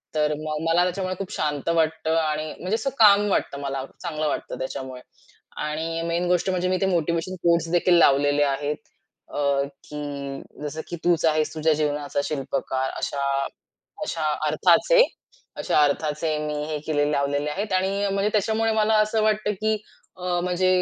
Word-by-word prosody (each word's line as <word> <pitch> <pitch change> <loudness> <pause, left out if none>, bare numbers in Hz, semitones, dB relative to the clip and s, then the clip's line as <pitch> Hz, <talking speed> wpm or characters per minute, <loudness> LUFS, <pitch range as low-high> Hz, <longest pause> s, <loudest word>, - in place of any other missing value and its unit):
तर 150 0 +2
मग 155 0 -3
मला 175 +2 +4
त्याच्यामुळे 185 +1 -2
खूप 195 -1 -6
शांत 150 0 -2
वाटतं 160 0 +1
आणि 155 -1 -1
म्हणजे 185 +4 -1
असं 270 +4 -1
काल्म 205 -1 +7
वाटतं 140 - 0
मला 135 -1 -3 0.2
चांगलं 155 -3 -2
वाटतं - - -3
त्याच्यामुळे. 130 -1 -5 0.6
आणि 160 +2 -2
मेन 170 +1 0
गोष्ट 180 +1 +1
म्हणजे 180 -1 0
मी 185 - +2
ते 195 - +3
मोटिव्हेशन 170 0 0
कोट्सदेखील 170 +1 +3
लावलेले 145 -1 +4
आहेत. 145 +1 0 0.6
अ, 140 -1 +1 0.3
की 140 -2 -5 0.2
जसं 150 +2 -4
की - - -5
"तूच 170 -2 +2
आहेस 155 -1 +2
तुझ्या 160 0 +2
जीवनाचा 145 -1 -1
शिल्पकार" 135 -2 -2
अशा 140 -1 -2 0.8
अशा 165 -5 -3 0.2
अर्थाचे. 175 - +5 0.5
अशा 150 - +2
अर्थाचे 150 +2 0
मी 150 - -2
हे 155 -1 -3
केलेले 145 -1 +1
लावलेले 145 +1 0
आहेत 200 +6 -3
आणि 195 +2 +1
म्हणजे 200 +1 +1
त्याच्यामुळे 220 +2 +1
मला 220 0 +2
असं 215 +1 +1
वाटतं 215 -1 +1
की 215 0 +2 0.4
अ, 180 -1 -1
म्हणजे 180 +1 +1
160 Hz, 155 wpm, -24 LUFS, 145-185 Hz, 0.8 s, काल्म